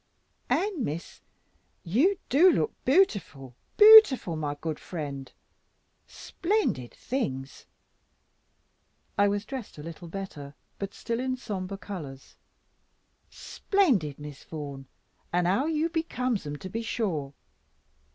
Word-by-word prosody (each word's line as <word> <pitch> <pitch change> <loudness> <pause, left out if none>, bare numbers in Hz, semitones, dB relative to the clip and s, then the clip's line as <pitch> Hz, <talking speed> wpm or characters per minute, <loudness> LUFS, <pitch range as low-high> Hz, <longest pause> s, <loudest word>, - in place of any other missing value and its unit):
"And, 385 - 0
Miss, 160 0 -5 0.6
you 275 - +2
do 340 +8 +6
look - - 0
bootiful, 190 - +1 0.2
bootiful, 420 - +8
my 150 -2 -3
good 155 -1 -4
friend! 140 -6 -6 0.8
Splendid 350 - -2
things," 135 - -4 1.5
I 205 - +4
was 205 +1 -1
dressed 260 - -7
a 150 - -8
little 165 +1 -9
better, 160 -6 -7 0.2
but 200 0 -5
still 230 0 -3
in 255 0 -2
sombre 195 -5 -5
colours 150 -10 -9 0.9
"splendid, 240 - 0
Miss 145 -2 -10
Vaughan, 140 -4 -7 0.4
and 175 0 +1
how 200 - +2
you 320 0 +1
becomes 255 - -2
'em 145 - -4
to 185 +6 -8
be 230 - -3
sure! 165 - -3
195 Hz, 110 wpm, -27 LUFS, -, 1.5 s, bootiful